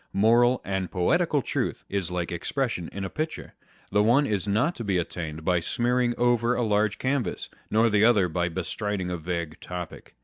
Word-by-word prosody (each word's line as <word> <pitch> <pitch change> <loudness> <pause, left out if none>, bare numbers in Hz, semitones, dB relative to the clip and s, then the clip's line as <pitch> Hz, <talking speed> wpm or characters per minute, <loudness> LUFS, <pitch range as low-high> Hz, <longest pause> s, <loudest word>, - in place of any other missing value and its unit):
Moral 120 +4 +4
and 95 -2 -2
poetical 90 -2 +1
truth - - -2
is 95 -3 -2
like 90 -1 -3
expression 90 - -2
in 100 -1 -4
a - - -4
picture 155 +1 -4
â€" - - -37 0.3
the 105 +1 +4
one 120 +7 +4
is 105 -4 -1
not 110 - +2
to 115 - -6
be 100 -3 +1
attained 80 -2 -4
by 90 -1 +3
smearing 120 +6 0
over 120 0 +2
a 120 - 0
large 105 -1 +1
canvas, 130 -6 -1 0.2
nor 110 +2 +4
the 105 -1 +3
other 110 -5 +5
by 85 0 -1
bestriding 95 +2 -3
a 90 - -2
vague 85 -1 -4
topic. 90 -7 -8
100 Hz, 190 wpm, -26 LUFS, 90-120 Hz, 0.3 s, other